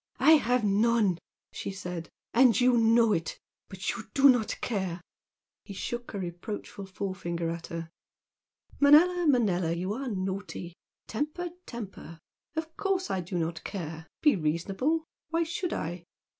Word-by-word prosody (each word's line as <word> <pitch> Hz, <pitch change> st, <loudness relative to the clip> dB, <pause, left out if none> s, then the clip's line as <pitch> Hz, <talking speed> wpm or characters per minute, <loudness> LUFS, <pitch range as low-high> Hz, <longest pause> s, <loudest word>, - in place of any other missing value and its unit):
"I 315 Hz, -, +6 dB
have 250 Hz, -3 st, +1 dB
none!" 210 Hz, -2 st, +3 dB, 0.3 s
she -, -, -5 dB
said 180 Hz, -4 st, -6 dB, 0.2 s
"And 235 Hz, -3 st, +6 dB
you 250 Hz, 0 st, +5 dB
know 230 Hz, -1 st, +5 dB
it! 165 Hz, -3 st, -2 dB, 0.3 s
But 190 Hz, 0 st, -2 dB
you 235 Hz, -3 st, -6 dB
do 275 Hz, 0 st, +7 dB
not 230 Hz, -4 st, +2 dB
care!" 190 Hz, -6 st, -2 dB, 0.6 s
He 200 Hz, -, -9 dB
shook 240 Hz, +2 st, -4 dB
a -, -, -2 dB
reproachful 190 Hz, +2 st, -6 dB
forefinger 185 Hz, -3 st, -3 dB
at 170 Hz, 0 st, -6 dB
her. 165 Hz, -1 st, -5 dB, 0.9 s
"Manella, 335 Hz, +5 st, +6 dB
Manella, 190 Hz, -, +3 dB
you 185 Hz, +4 st, -2 dB
are 265 Hz, +4 st, -4 dB
naughty! 190 Hz, -4 st, -4 dB, 0.3 s
Temper, 305 Hz, +9 st, -3 dB, 0.2 s
temper! 200 Hz, -7 st, -8 dB, 0.4 s
Of 320 Hz, 0 st, -4 dB
course 385 Hz, -2 st, 0 dB
I 190 Hz, -, 0 dB
do 180 Hz, +1 st, -4 dB
not 165 Hz, 0 st, -2 dB
care! 160 Hz, -4 st, -6 dB, 0.2 s
Be 300 Hz, -2 st, +6 dB
reasonable! 195 Hz, -, 0 dB, 0.2 s
Why 330 Hz, +1 st, +1 dB
should 335 Hz, +2 st, -3 dB
I?" 170 Hz, +2 st, -4 dB
205 Hz, 145 wpm, -29 LUFS, 175-255 Hz, 0.9 s, do